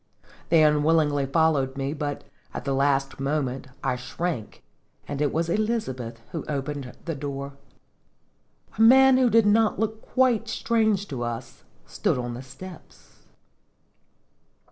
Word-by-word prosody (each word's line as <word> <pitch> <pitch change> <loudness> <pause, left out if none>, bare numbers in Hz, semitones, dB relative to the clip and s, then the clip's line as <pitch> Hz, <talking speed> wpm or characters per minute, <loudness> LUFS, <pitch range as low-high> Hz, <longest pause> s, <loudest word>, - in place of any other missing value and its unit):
They 160 -2 +5
unwillingly 150 -2 +3
followed 135 -3 +1
me; 135 +1 -2
but, 145 -2 -4 0.3
at - - -5
the 140 - 0
last 135 0 +1
moment, 135 -2 -2 0.2
I 130 -2 0
shrank, 125 0 -4 0.4
and 145 0 -4
it 145 - +2
was 165 +1 0
Elizabeth 170 - -2
who 165 - -4
opened 140 -2 -4
the 165 - -2
door. 140 -1 -5 1.3
A - - +3
man 265 +3 +7
who 255 -2 +4
did 225 -1 +4
not 215 +1 +3
look 220 0 -2
quite 245 -4 +1
strange 220 -3 +1
to 130 -4 -4
us, 120 -1 -5 0.2
stood - - -1
on 120 -1 -3
the 120 - -7
steps. 155 +8 -13
150 Hz, 135 wpm, -25 LUFS, 135-205 Hz, 1.3 s, man